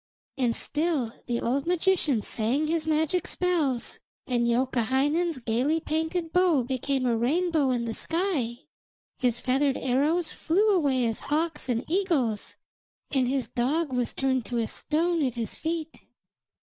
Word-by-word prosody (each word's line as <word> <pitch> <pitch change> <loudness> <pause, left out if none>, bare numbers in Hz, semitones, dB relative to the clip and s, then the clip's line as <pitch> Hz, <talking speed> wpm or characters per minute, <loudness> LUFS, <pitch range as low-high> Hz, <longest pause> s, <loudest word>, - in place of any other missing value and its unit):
And 245 -4 +1
still 295 -7 -1
the 240 -1 0
old 270 +5 -1
magician 345 - +2
sang 240 +7 0
his 320 0 -1
magic 315 +3 +1
spells, 315 -9 0 0.3
and 240 -2 +1
Youkahainen's 265 +7 +1
gaily 255 +7 0
painted 320 +2 -2
bow 355 -7 +4
became 260 +1 -1
a 240 -2 +2
rainbow 305 +4 +1
in 245 -2 0
the 225 - -3
sky, 315 - -1 0.6
his 245 -2 +1
feathered 270 +1 +1
arrows 295 +7 +1
flew 395 +7 +2
away 280 - +2
as 225 -1 -1
hawks 305 -2 -1
and 235 -1 0
eagles, 310 - 0 0.6
and 265 -3 +2
his 265 0 0
dog 275 +4 0
was 245 -2 0
turned 260 -2 +1
to 240 - -2
a 230 - +1
stone 325 +6 0
at 255 -3 -1
his 230 -2 -3
feet. 325 -1 -3
275 Hz, 145 wpm, -27 LUFS, 245-325 Hz, 0.6 s, bow